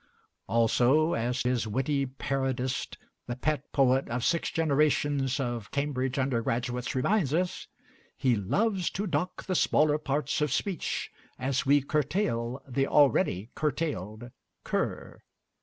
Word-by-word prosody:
Also, 125 +7 +3
as 120 +3 -1
his 125 -2 0
witty 135 +4 0
parodist, 130 -1 -2 0.3
the 120 - -3
pet 145 +1 -2
poet 135 -1 +3
of 120 +1 -2
six 170 - +1
generations 145 -3 +1
of 120 -5 -3
Cambridge 135 -2 -1
undergraduates, 125 -1 -1
reminds 155 +2 +1
us: 180 +1 -1 0.5
He 130 -3 +2
loves 185 - 0
to 200 - -3
dock 180 0 -2
the 190 - -2
smaller 150 -3 +3
parts 145 0 -1
of 150 -2 +1
speech, 185 +4 -2 0.3
As 130 0 -1
we 145 0 +5
curtail 140 - -1
the 135 +1 0
already 115 -7 +3
cur 155 - +1
tailed 120 - -4 0.3
cur." - - -3
135 Hz, 125 wpm, -28 LUFS, 125-150 Hz, 0.5 s, we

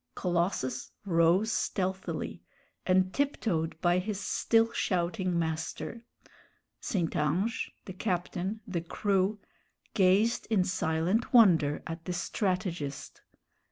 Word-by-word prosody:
Colossus 170 -8 -1 0.2
rose 175 +4 +3
stealthily, 190 -2 -2 0.5
and 185 0 +3
tiptoed 180 - -1
by 175 +1 +3
his 200 +1 -3
still 225 +3 +2
shouting 180 -2 0
master. 160 +7 -3 0.8
St. 175 -7 -2
Ange, 170 +10 0 0.2
the 190 - -7
captain, 185 +1 -2
the 180 -4 -2
crew, 195 +3 0 0.6
gazed 200 +4 +3
in 210 -5 +3
silent 180 +6 0
wonder 165 -10 +5
at 165 0 -6
the 180 - -2
strategist. 175 -7 -3
185 Hz, 100 wpm, -30 LUFS, 165-205 Hz, 0.8 s, wonder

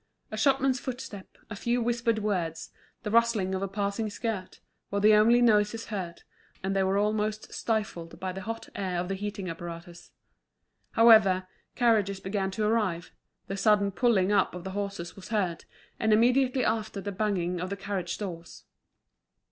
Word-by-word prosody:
A - - -3
shopman's 265 +2 +2
footstep, 245 -7 -7
a 215 - -7
few 240 +4 0
whispered 235 -1 +1
words, 185 -7 -2 0.3
the 210 - -3
rustling 230 -5 +3
of 190 - -2
a 195 - -1
passing 200 +2 -2
skirt, 205 -3 -4 0.3
were 200 - -1
the 215 +1 +6
only 230 +3 +5
noises 215 0 +3
heard, 180 -4 -5 0.4
and 195 +1 -1
they 195 - +3
were 190 +1 +1
almost 210 +1 -1
stifled 210 -7 -3
by 185 0 -3
the 190 +1 -6
hot 225 +3 -5
air 185 -3 -2
of 180 +1 -3
the - - 0
heating 200 -1 -4
apparatus. 170 +1 -8 0.8
However, 205 -5 +6 0.3
carriages 215 -5 +2
began 195 0 -2
to 210 +3 -2
arrive, 210 -6 0 0.3
the 195 - -4
sudden 200 0 +3
pulling 205 -3 +2
up 200 -3 +2
of 180 - -7
the 190 - -5
horses 200 -3 -4
was 195 - -11
heard, 190 -6 -1 0.3
and 220 - +2
immediately 250 +3 +3
after 220 -2 -1
the 200 +1 -4
banging 185 -3 -1
of 180 - -3
the 200 - -4
carriage 195 -3 -3
doors. 175 -5 -7
205 Hz, 165 wpm, -28 LUFS, 190-220 Hz, 0.8 s, the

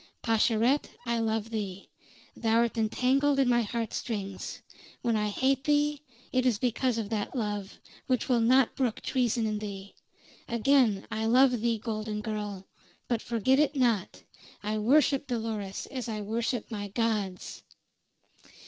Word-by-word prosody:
"Pascherette, 230 +4 +2 0.2
I 235 0 0
love 225 0 -1
thee. 200 -3 -4 0.5
Thou'rt 230 0 +2
entangled 260 +6 +2
in 270 -2 +3
my 240 -1 +4
heart 230 0 -3
strings. 195 -5 -4 0.4
When 235 -2 +2
I 210 -1 +1
hate 265 +5 +1
thee, 295 -1 +2 0.3
it 255 -1 +3
is 245 -4 +2
because 245 +1 0
of 215 -3 -3
that 220 +3 -3
love, 205 -4 -3 0.3
which 255 -3 +1
will 245 -2 +3
not 250 +2 +4
brook 250 -5 -1
treason 245 -3 0
in 215 -1 -1
thee. 200 -2 -7 0.5
Again, 235 -3 +3
I 220 +1 -1
love 250 0 +4
thee, 230 -1 +1
golden 215 -1 -4
girl; 210 -3 -4 0.4
but, 235 -2 0
forget 240 +4 +2
it 300 0 +2
not, 235 -8 0 0.4
I 215 +1 -1
worship 275 +4 +3
Dolores 220 -5 -3
as 255 -3 -4
I 215 -1 -3
worship 230 +3 -2
my 205 -2 -4
gods!" 205 -3 -2
230 Hz, 145 wpm, -29 LUFS, 210-255 Hz, 0.5 s, my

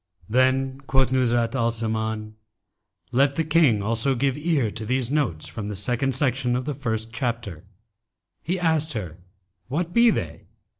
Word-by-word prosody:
Then 130 +3 +1
quoth 135 -1 +2
Nuzhat 120 -2 +2
al 115 -3 +1
Zaman, 110 -1 -3 0.8
"Let 135 +2 +3
the 165 - +1
King 150 -10 +3
also 115 +5 +1
give 135 +1 +1
ear 150 -8 0
to 110 - -6
these 125 +2 -1
notes 125 - 0
from 105 -3 -6
the 105 - -4
second 125 +6 0
section 130 -2 +1
of 125 0 -2
the 150 - -2
first 115 -4 -3
chapter." 115 - -3 0.8
He 180 +2 -2
asked 160 -2 +1
her 90 -7 -5 0.5
'What 170 +7 -2
be 235 0 +6
they?' - - -3
125 Hz, 155 wpm, -24 LUFS, 110-140 Hz, 0.8 s, be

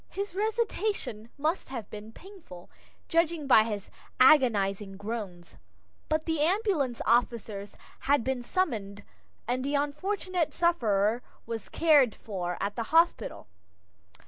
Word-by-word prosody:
His 400 -2 -5
resuscitation 415 - -2
must 310 +3 -1
have 235 -6 -6
been 210 +1 -8
painful, 330 - -13 0.4
judging 335 -2 +1
by 220 -5 +6
his 210 -3 -5 0.3
agonizing 205 -8 +4
groans, 200 -5 -6 0.5
but 310 0 0
the 320 -2 -1
ambulance 335 - +1
officers 225 -4 0 0.3
had 285 -3 +2
been 260 0 -1
summoned 220 - -2 0.4
and 250 +1 -1
the 285 +2 -1
unfortunate 340 +4 -1
sufferer 230 - +2 0.2
was 225 -2 -6
cared 290 -8 +4
for 180 -4 -4
at 200 - -2
the 230 - -3
hospital. 330 +2 +2
255 Hz, 120 wpm, -28 LUFS, 210-330 Hz, 0.5 s, by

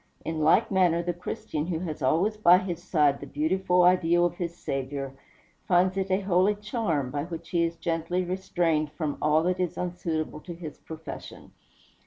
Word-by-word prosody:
In 160 -1 -2
like 175 +9 +4
manner 175 -3 +3
the 175 0 -1
Christian, 165 -2 -4
who 175 -3 -1
has 160 -4 -5
always 170 +11 +2
by 180 -4 +6
his 180 -3 -4
side 150 -6 +2
the 140 - -8
beautiful 180 +5 +1
ideal 175 -1 +4
of 175 - 0
his 170 -1 -4
Saviour, 135 0 -4 0.5
finds 185 +1 +3
it 195 0 -1
a 190 +1 +2
holy 190 +2 +3
charm, 205 - -2
by 145 +1 -2
which 165 -1 -8
he 170 -1 +2
is 165 0 -3
gently 170 +2 -1
restrained 175 -4 0
from 150 -1 -3
all 155 +1 +3
that 180 +1 0
is 180 -2 -1
unsuitable 170 -4 -3
to 170 +2 -8
his 165 -3 -8
profession. 160 0 -9
170 Hz, 180 wpm, -27 LUFS, 155-185 Hz, 0.5 s, by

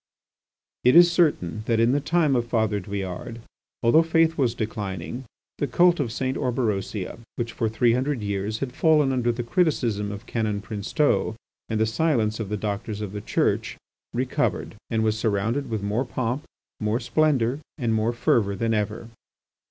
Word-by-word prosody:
It 125 - +5
is 175 0 +8
certain 145 - +1
that 115 -1 +2
in 115 +2 +4
the 140 - +2
time 155 -1 +2
of 120 -1 0
Father 110 -3 +1
Douillard, 100 +4 -5 0.4
although 120 +8 +6
faith 165 0 +2
was 125 -6 +1
declining, 110 +1 -4 0.3
the 145 - 0
cult 175 +6 +4
of 125 -6 -1
St. 130 +2 -2
Orberosia, 110 -5 -2 0.2
which 115 -1 -3
for 115 -2 -1
three 115 +2 +3
hundred 130 -1 -1
years 100 +1 -2
had 130 -2 -3
fallen 150 -4 +3
under 120 -2 +1
the 120 +1 -3
criticism 120 - 0
of 100 +3 -8
Canon 110 -4 -1
Princeteau 110 +4 0 0.3
and 110 -1 -1
the 110 - +3
silence 110 -3 +1
of 110 -4 -4
the 105 - -1
Doctors 105 +1 -3
of 105 -3 -4
the 105 0 -5
Church, - - 0 0.3
recovered, 130 +2 -1 0.2
and 110 -1 +1
was 110 0 +1
surrounded 110 +6 0
with 110 -3 -2
more 105 +5 0
pomp, 125 +2 -3 0.3
more 110 +2 0
splendour, 135 -1 +1 0.2
and 120 -6 0
more 110 +1 +1
fervour 110 -4 +1
than 115 +3 0
ever. 110 +2 -2
115 Hz, 165 wpm, -25 LUFS, 105-130 Hz, 0.4 s, is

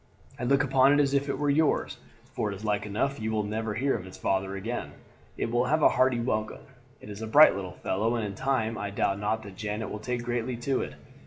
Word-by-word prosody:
I 125 - -2
look 140 +3 +3
upon 135 0 +4
it 145 - +3
as 140 -1 +2
if 140 0 +1
it 140 - -1
were 145 0 +1
yours, 155 +1 +1 0.3
for 105 - -1
it - - -5
is 105 +3 -9
like 105 -1 0
enough 130 +7 -1
you 110 0 -2
will 110 -1 0
never 105 +1 -3
hear 135 +4 +1
of 95 - -6
its 95 - -11
father 95 0 -1
again. 115 +5 -4 0.4
It - - -2
will 120 +1 +2
have 155 +4 +1
a - - +8
hearty 130 -2 +2
welcome. 110 -3 -2 0.4
It 105 - -9
is 100 +1 -8
a 110 - -4
bright 150 +7 +8
little 95 -2 -5
fellow, 110 +5 -1
and 115 -2 -1
in 100 - -4
time 115 0 -1
I 100 - -3
doubt 100 0 0
not 110 +2 -1
that 100 -2 -11
Janet 105 0 -4
will 105 - -5
take 120 +2 -3
greatly 120 0 -2
to 130 +2 -1
it. - - -6
115 Hz, 250 wpm, -28 LUFS, 105-130 Hz, 0.4 s, a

